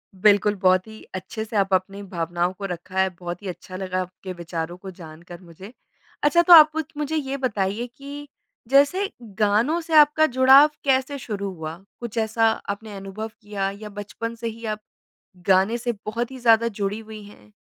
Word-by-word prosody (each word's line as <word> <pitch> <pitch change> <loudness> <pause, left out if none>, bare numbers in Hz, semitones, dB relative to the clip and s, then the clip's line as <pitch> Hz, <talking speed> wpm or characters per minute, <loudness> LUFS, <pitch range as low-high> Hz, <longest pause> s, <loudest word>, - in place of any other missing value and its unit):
बिल्कुल 205 +1 +4
बहुत 185 +2 +3
ही 220 0 -12
अच्छे 220 +4 -5
से 220 0 -9
आप 195 -1 +1
अपनी 195 +2 0
भावनाओं 175 -1 -2
को 195 +1 -7
रखा 180 0 -6
है। 190 - +3
बहुत 175 0 -6
ही - - -6
अच्छा 185 0 -8
लगा 185 -1 -2
आपके 185 +1 -8
विचारों 170 0 -5
को 190 +1 -9
जानकर 170 0 -12
मुझे। 185 +5 -13 0.5
अच्छा 320 +4 +5
तो 345 +1 +7
आप 310 -2 +10
उत 320 -2 -2
मुझे 300 +1 -2
ये 275 -2 -2
बताइए 215 -2 -1
कि 285 +1 -9 0.4
जैसे 285 +9 +4 0.3
गानों 220 +10 +2
से 325 0 -7
आपका 300 +1 +6
जुड़ाव 265 +3 +8
कैसे 270 +1 +1
शुरू 200 -5 -4
हुआ? 160 -1 -7 0.2
कुछ 235 -1 -7
ऐसा 225 0 +2 0.2
आपने 205 +1 -5
अनुभव 195 +3 -6
किया 205 -2 -3
या 210 - -7
बचपन 210 +3 -6
से 230 0 -5
ही 230 +1 -7
आप 215 -1 -3 0.7
गाने 195 +5 +3
से 240 0 -2
बहुत 235 +3 -2
ही 265 - -9
ज़्यादा 230 -1 +4
जुड़ी 200 -1 -3
हुई 220 -1 -10
हैं? 105 - -17
210 Hz, 185 wpm, -23 LUFS, 185-245 Hz, 0.7 s, आप